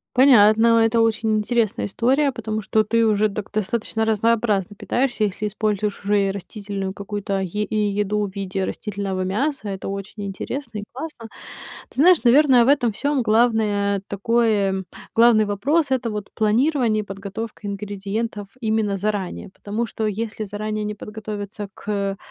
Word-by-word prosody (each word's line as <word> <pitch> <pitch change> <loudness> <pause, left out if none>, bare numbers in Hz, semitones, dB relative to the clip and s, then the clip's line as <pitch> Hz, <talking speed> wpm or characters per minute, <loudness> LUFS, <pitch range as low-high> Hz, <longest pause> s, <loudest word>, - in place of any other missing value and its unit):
Понятно, 230 -3 +6
это 225 +1 +3
очень 225 -1 +1
интересная 220 0 0
история, 265 +7 +2
потому 215 -3 -4
что 215 +2 +2
ты 230 +2 +2
уже 215 0 +3
так 205 0 -6
достаточно 220 +1 -1
разнообразно 215 -2 +1
питаешься, 240 +1 0
если 205 +1 -3
используешь 210 -1 -1
уже 200 -1 +2
и 195 - 0
растительную 200 -1 -5
какую-то 200 -1 -3
е 190 +3 -2
и - - -5 0.2
еду 210 +1 0
в 195 - -7
виде 195 -1 -2
растительного 200 -3 -4
мяса. 215 +5 -1
Это 195 -1 -5
очень 200 +1 -6
интересно 230 +4 -5
и - - -6
классно. 260 -4 -7 0.6
Ты - - -13
знаешь, 345 +1 +6
наверное, 255 -1 +6
в - - -1
этом 270 -5 +3
всём 285 +3 0
главное 215 -3 +2
такое 200 -3 +1 0.3
главный 230 -2 +6
вопрос- 275 +9 0
это 250 -3 0
вот 210 -2 -5
планирование 230 +1 +2
и - - -17
подготовка 205 +2 -7
ингредиентов 205 +1 -4
именно 215 -3 0
заранее. 200 -2 -3
Потому 215 +3 -3
что 220 -1 -3
если 215 +1 -3
заранее 215 +1 -3
не 210 - -4
подготовиться 210 -1 -6
к, 200 -1 -3
215 Hz, 150 wpm, -22 LUFS, 200-230 Hz, 0.6 s, Понятно